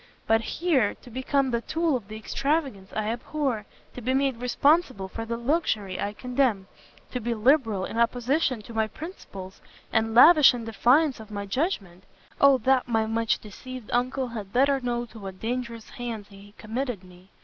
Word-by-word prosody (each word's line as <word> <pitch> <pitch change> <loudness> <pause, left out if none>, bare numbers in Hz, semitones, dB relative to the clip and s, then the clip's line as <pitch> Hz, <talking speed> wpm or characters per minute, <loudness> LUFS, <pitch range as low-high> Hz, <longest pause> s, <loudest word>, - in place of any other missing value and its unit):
but 225 0 +3
here, 275 - +1
to 245 - -16
become 260 +2 0
the 235 -1 0
tool 325 +2 0
of 225 -6 -4
the 215 - -8
extravagance 270 -3 -2
I 215 0 -1
abhor! 240 -2 -2 0.3
to 250 - -8
be 255 +3 0
made 270 -2 +1
responsible 250 - +2
for 225 +4 -6
the 230 +1 -3
luxury 235 - -1
I 205 - -2
condemn! 245 -5 0 0.4
to 250 - -2
be 235 +1 -1
liberal 225 -5 +2
in 230 - -4
opposition 245 +1 +1
to 230 - -11
my 220 -1 +1
principles, 200 - -9 0.3
and 225 0 +1
lavish 300 0 +8
in 235 -2 -6
defiance 250 +5 +3
of 220 -1 -11
my 200 -1 -5
judgment! 195 - -2 0.3
Oh 280 -1 +7
that 255 +2 +2
my 225 -2 +1
much 225 0 +1
deceived 250 +3 -10
Uncle 255 +1 0
had 210 -4 -7
better 275 +3 +3
known 240 -1 -2
to 225 -1 -13
what 190 -2 -8
dangerous 235 -1 -4
hands 230 -4 -6
he 200 +1 -15
committed 235 -2 -4
me! 180 +1 -17
235 Hz, 175 wpm, -26 LUFS, 215-265 Hz, 0.4 s, lavish